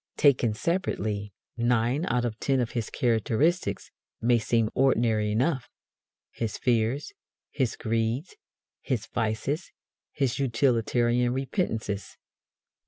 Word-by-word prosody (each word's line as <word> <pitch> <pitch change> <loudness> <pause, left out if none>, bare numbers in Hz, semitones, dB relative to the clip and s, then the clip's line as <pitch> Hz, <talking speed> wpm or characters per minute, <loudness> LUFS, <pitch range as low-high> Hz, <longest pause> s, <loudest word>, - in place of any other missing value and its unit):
Taken 125 -6 +4
separately, 105 - -1 0.3
nine 120 +5 +1
out 120 0 +1
of 110 -2 -3
ten 135 -1 +1
of 120 -2 -1
his 120 -3 -3
characteristics 125 - +1 0.3
may 120 0 +3
seem 115 0 +1
ordinary 115 -5 +2
enough 130 +5 0 0.6
his 115 -2 -3
fears, 120 +3 0 0.4
his 130 -5 0
greeds, 115 - -1 0.5
his 125 -7 -2
vices, 115 +9 -2 0.4
his 135 -3 -1
utilitarian 120 -1 +2
repentances. 120 - -2
120 Hz, 105 wpm, -27 LUFS, 110-135 Hz, 0.6 s, Taken